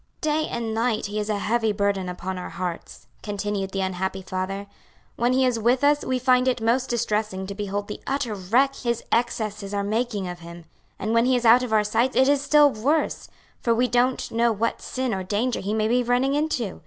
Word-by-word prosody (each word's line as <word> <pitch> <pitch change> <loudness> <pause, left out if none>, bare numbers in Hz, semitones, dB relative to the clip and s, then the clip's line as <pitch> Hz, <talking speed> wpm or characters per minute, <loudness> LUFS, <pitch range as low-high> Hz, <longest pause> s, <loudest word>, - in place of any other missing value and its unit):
"Day 310 0 0
and 230 -2 -3
night 225 -1 0
he 210 +1 -3
is 210 0 -3
a 210 - 0
heavy 225 +2 +1
burden 200 -2 -1
upon 180 +1 -5
our 180 - -6
hearts," 175 -1 -6 0.2
continued 205 -1 -3
the 195 0 -3
unhappy 190 0 -2
father; 185 +2 -4 0.5
"when 240 +2 +1
he 260 +1 +3
is 245 -3 +1
with 245 +4 +2
us 290 0 +3
we 260 - 0
find 255 0 +3
it 250 -1 +1
most 240 +3 +1
distressing 215 -5 -1
to 200 - -5
behold 205 0 -4
the 210 - -7
utter 270 -5 -1
wreck 230 +8 +2
his 235 -2 -2
excesses 215 -4 -1
are 200 - 0
making 215 -2 -1
of 175 0 -6
him, 170 0 -11 0.3
and 215 +3 -2
when 230 +1 +4
he 260 - +3
is 245 -1 -1
out 235 +2 +7
of 250 -3 -4
our 215 -1 +4
sight 230 +5 0
it 265 - +5
is 285 -1 +3
still 295 0 +5
worse; 285 +9 -1 0.3
for 230 -1 +1
we 245 +2 +2
don't 250 +1 +1
know 235 +1 +2
what 225 +2 -1
sin 260 -3 -2
or 190 - -2
danger 210 +6 -1
he 200 - -3
may 215 0 +1
be 245 +2 +2
running 245 +3 +1
into. 285 -9 -1
225 Hz, 215 wpm, -24 LUFS, 200-250 Hz, 0.5 s, out